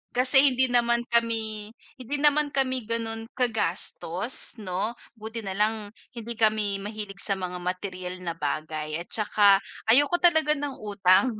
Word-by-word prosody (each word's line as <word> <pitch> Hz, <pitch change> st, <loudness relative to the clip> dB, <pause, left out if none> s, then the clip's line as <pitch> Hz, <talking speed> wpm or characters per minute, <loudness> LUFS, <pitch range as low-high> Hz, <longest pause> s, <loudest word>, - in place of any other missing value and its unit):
Kasi 255 Hz, +2 st, +4 dB
hindi 260 Hz, +1 st, +2 dB
naman 235 Hz, -1 st, +2 dB
kami, 220 Hz, -2 st, -1 dB, 0.3 s
hindi 255 Hz, +3 st, -5 dB
naman 295 Hz, 0 st, +2 dB
kami 260 Hz, -2 st, 0 dB
gano'n 225 Hz, -1 st, -4 dB
kagastos 215 Hz, -2 st, +3 dB
'no. 205 Hz, +3 st, -4 dB, 0.2 s
Buti 220 Hz, +1 st, -7 dB
nalang 210 Hz, +2 st, -2 dB, 0.2 s
hindi 235 Hz, 0 st, -6 dB
kami 215 Hz, -2 st, +1 dB
mahilig 205 Hz, -1 st, -6 dB
sa 200 Hz, -, 0 dB
mga 180 Hz, -1 st, -6 dB
materyal 185 Hz, 0 st, -5 dB
na 170 Hz, -, -3 dB
bagay 155 Hz, 0 st, -4 dB
at 175 Hz, -, -9 dB
saka 205 Hz, -2 st, +4 dB, 0.3 s
ayoko 290 Hz, +8 st, +4 dB
talaga 315 Hz, -3 st, +4 dB
ng 285 Hz, -2 st, -5 dB
utang. 205 Hz, +3 st, +2 dB
220 Hz, 135 wpm, -25 LUFS, 195-245 Hz, 0.3 s, Kasi